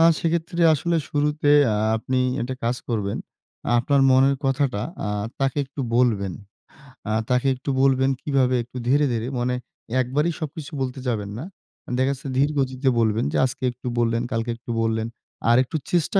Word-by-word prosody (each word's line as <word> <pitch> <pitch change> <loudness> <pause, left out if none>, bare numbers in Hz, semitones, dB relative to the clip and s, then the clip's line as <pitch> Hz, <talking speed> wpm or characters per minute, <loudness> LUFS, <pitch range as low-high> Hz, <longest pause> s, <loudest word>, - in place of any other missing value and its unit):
আ - - +6 0.2
সেক্ষেত্রে 170 +1 -1
আসলে 170 +3 0
শুরুতে 150 0 +1 0.2
আ - - 0 0.2
আপনি 130 +3 -1 0.2
একটা 130 +2 -3
কাজ 120 +2 +1
করবেন। 105 -4 -1 0.6
আপনার 140 +3 +2
মনের 135 +1 +5
কথাটা 135 -5 +1 0.2
আ - - -1 0.3
তাকে 135 +1 +1
একটু 135 +1 -8 0.2
বলবেন। 105 -7 +2 0.8
আ - - 0 0.2
তাকে 125 +2 +2
একটু 130 - -6
বলবেন 135 0 +4
কিভাবে? 130 -3 +2
একটু 125 +2 -11
ধীরে, 145 +3 +4
ধীরে 115 +1 -2
মানে 125 +1 0 0.5
একবারই 145 +7 0
সবকিছু 155 -1 -6
বলতে 130 0 -3
যাবেন 105 -3 -2
না। 155 - -5 0.5
দেখা 130 +1 +2
গেছে 140 +1 -7
ধীরগতিতে 135 -2 +1
বলবেন 110 0 +2
যে - - +1
আজকে 130 - -5
একটু 125 +1 -9
বললেন, 115 0 +1
কালকে 115 +1 -1
একটু 120 0 -8
বললেন। 110 0 0 0.4
আরেকটু 130 +6 +3
চেষ্টা 175 +3 +2
130 Hz, 160 wpm, -23 LUFS, 120-145 Hz, 0.8 s, আ